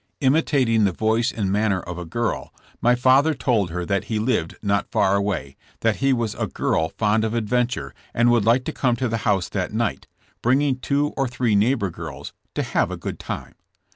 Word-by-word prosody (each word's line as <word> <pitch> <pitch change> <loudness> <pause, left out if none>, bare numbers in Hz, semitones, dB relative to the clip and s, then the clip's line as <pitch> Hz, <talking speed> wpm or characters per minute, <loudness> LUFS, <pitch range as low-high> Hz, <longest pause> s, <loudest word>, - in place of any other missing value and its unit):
Imitating 130 -5 +3
the 100 - +3
voice 110 +5 +1
and 100 -4 -2
manner 100 -2 +1
of 90 0 -7
a 90 - -6
girl 115 +8 -2 0.3
my 120 +1 +4
father 130 +5 +4
told 115 -8 +1
her 90 +1 -3
that 100 +1 -1
he 110 - -2
lived 110 -7 0
not 100 -1 0
far 95 - +2
away, 95 -9 -2 0.3
that 115 -2 +2
he 135 0 +2
was 115 -4 0
a - - -2
girl 80 0 0
fond 110 0 +2
of 110 +1 -1
adventure, 120 - -1 0.2
and 120 +1 +3
would 120 -3 +3
like 120 +4 +3
to 160 - -3
come 125 -3 +1
to 130 +2 -1
the 115 0 -1
house 95 -3 +1
that - - -3
night, - - -1 0.3
bringing 130 +2 +2
two 145 +3 +1
or 135 -1 0
three 120 -2 0
neigh 110 +7 +3
bor 100 -7 -2
girls, 80 -4 -8 0.2
"to - - 0
have - - 0
a - - -5
good - - -6
time.' - - -6
115 Hz, 205 wpm, -23 LUFS, 100-125 Hz, 0.3 s, my